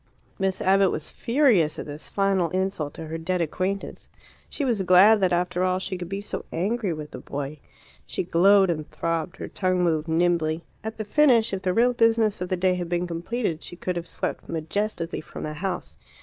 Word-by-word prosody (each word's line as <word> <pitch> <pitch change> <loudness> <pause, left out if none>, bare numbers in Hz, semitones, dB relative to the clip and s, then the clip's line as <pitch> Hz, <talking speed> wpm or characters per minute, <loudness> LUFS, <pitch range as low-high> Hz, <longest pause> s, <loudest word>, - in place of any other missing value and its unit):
Miss 190 -1 0
Abbott 195 0 +4
was 155 - -4
furious 230 - +2
at - - -5
this 145 +1 -7
final 195 -3 +1
insult 185 -4 -2
to 160 - -6
her 160 +1 -5
dead 180 +3 -1
acquaintance. 185 +4 -3 0.4
She 285 - -3
was 235 -6 +1
glad 190 +4 +6
that 185 -2 +2
after 180 +1 0
all 185 0 +2
she 185 0 -3
could 175 -1 -6
be 195 +1 -3
so 205 - -5
angry 200 +3 -1
with 155 -2 -6
the - - -7
boy. 145 +1 -5 0.5
She - - -2
glowed 190 +2 +5
and 155 -2 -4
throbbed; 165 +2 -2
her - - -6
tongue 185 -2 0
moved 160 -2 +1
nimbly. 165 -1 +1 0.2
At 220 0 -5
the 215 - -4
finish, 235 -3 +4
if 190 - -2
the 185 - 0
real 240 +6 +3
business 225 -4 +2
of 180 - -3
the 185 - 0
day 185 +1 +2
had 175 -2 -3
been 175 0 0
completed, 175 +1 -3
she - - -8
could 180 +1 -3
have 170 -1 -4
swept - - -4
majestically 165 +2 -2
from - - -9
the 155 - -4
house. 185 +5 -4
180 Hz, 205 wpm, -25 LUFS, 165-200 Hz, 0.5 s, glad